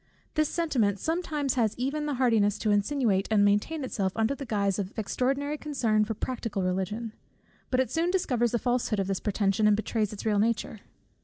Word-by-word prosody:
This 310 -1 +1
sentiment 245 - +1
sometimes 310 - -1
has 225 -5 0
even 285 +4 -2
the 290 - -1
hardiness 225 -5 +2
to 215 - 0
insinuate 205 -2 +1
and 210 -2 +4
maintain 210 +10 +1
itself 195 -7 -2
under 225 +4 +1
the 275 -1 -7
guise 200 -3 0
of 195 +2 -5
extraordinary 275 +7 -1
concern 230 -8 +1
for 220 +1 -3
practical 230 -4 -3
Religion; 195 +5 -2 0.6
but 255 - +1
it 260 - +1
soon 335 +2 +1
discovers 250 - +1
the 240 - +1
falsehood 240 -3 0
of 195 - +1
this 195 0 -2
pretension, 205 0 +1
and 210 -1 +4
betrays 215 -1 -1
its 210 - -8
real 210 -2 +2
nature. 225 0 0
225 Hz, 185 wpm, -28 LUFS, 205-270 Hz, 0.6 s, and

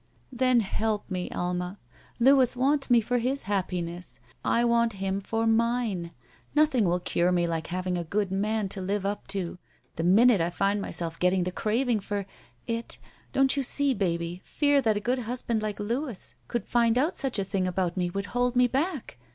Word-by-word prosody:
''Then 255 -1 +4
help 210 0 -2
me, 180 -1 -2
Alma. 180 +2 -3 0.4
Louis 260 0 +5
wants 275 +2 +2
me 240 -1 +6
for 245 +3 0
his 260 +4 -1
happiness. 180 -3 -3 0.2
I 235 +1 +2
want 235 -1 +2
him 195 0 -2
for 225 +3 -1
mine. 225 -5 +1 0.5
Nothing 295 -7 +4
will 175 0 +1
cure 175 0 +1
me 175 -1 +2
like 165 -1 -2
having 180 0 -2
a - - -2
good 200 +3 -1
man 210 +2 0
to 195 0 -5
live 195 +1 -2
up 205 +1 -3
to. 190 -3 -3 0.4
The 165 - -1
minute 210 +3 +5
I 165 - +1
find 200 +3 0
myself 165 -4 -4
getting 180 0 +2
the 180 - -2
craving 225 +4 0
for 200 0 -3 0.2
— - - -36
^it 230 0 -3 0.2
— - - -30
don't 270 0 +3
you 280 - +1
see, 280 +1 +2
baby, 175 -3 -2
fear 285 -1 +2
that 220 -4 +2
a - - 0
good 245 +5 0
husband 235 -1 -2
like 215 -1 -3
Louis 235 +2 -3
could 240 - -3
find 235 -1 +2
out 300 +7 +1
such 270 -5 -2
a 200 - +1
thing 190 -1 -1
about 180 -1 -1
me 180 -2 0
would 200 +2 -3
hold 245 0 +1
me 250 0 +5
back? 270 - -2
210 Hz, 195 wpm, -27 LUFS, 185-245 Hz, 0.5 s, me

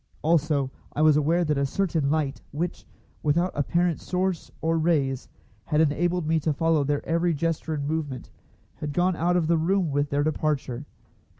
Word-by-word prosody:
Also, 150 -4 +2 0.2
I 150 - +1
was 155 -1 +6
aware 165 +4 +2
that 150 -2 +1
a 140 - +2
certain 160 -4 0
light, 150 -3 -1
which, 165 +4 -4 0.3
without 170 +4 +1
apparent 170 +3 0
source 185 -1 -2
or 165 +1 +1
rays, 140 -6 0 0.4
had 150 -1 +1
enabled 170 +3 +1
me 160 +1 +2
to 155 0 0
follow 165 0 +2
their 145 +1 -1
every 170 0 +1
gesture 160 +1 -1
and 140 -1 -3
movement, 150 -4 -3 0.5
had 150 -1 -4
gone 180 +3 +2
out 175 +2 +2
of 170 - +1
the 165 0 +2
room 180 0 +1
with 145 +1 0
their 145 +1 +1
departure. 145 -3 -1
155 Hz, 175 wpm, -26 LUFS, 145-170 Hz, 0.5 s, was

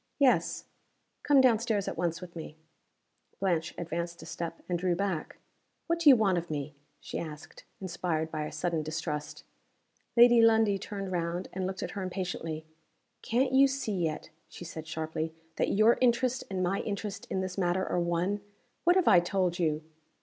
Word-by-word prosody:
"Yes." 275 -3 +2 0.6
"Come 285 -2 +5
down 240 -4 +5
stairs 220 -4 -1
at - - -3
once 170 -1 -1
with 175 -1 -10
me." 160 -1 -8 0.8
Blanche 170 -4 0
advanced 170 0 -4
a - - -9
step 170 -1 -6
and 175 -1 -1
drew 180 -1 +1
back. 190 -4 -2 0.5
"What 335 0 0
do 325 -3 +7
you 270 - +10
want 195 -6 +2
of 170 - -9
me?" 150 -1 -4 0.3
she - - -5
asked, 150 -3 -9
inspired 170 -4 -2
by 155 -1 -2
a - - -8
sudden 170 -3 -1
distrust. 155 -1 -4 0.7
Lady 240 0 +8
Lundie 220 -3 +4
turned 195 -1 -5
round, 175 +1 -2
and 185 0 -2
looked 190 0 -4
at - - -4
her 200 - -5
impatiently. 175 -4 -4 0.6
"Can't 255 +3 +1
you 275 +1 +7
see 270 -5 -2
yet," 165 -5 -2 0.2
she 175 - -9
said, 160 -1 -7
sharply, 160 0 -3 0.2
"that - - +1
your 215 +3 +5
interest 250 +1 +2
and 185 -2 -1
my 190 +2 0
interest 205 -1 -4
in 190 - -1
this 185 -1 -4
matter 185 0 0
are 180 - 0
one? 175 +4 0 0.4
What 350 +1 +6
have 375 -2 +3
I 175 - +8
told 180 0 0
you?" 155 -2 0
180 Hz, 180 wpm, -30 LUFS, 165-210 Hz, 0.8 s, you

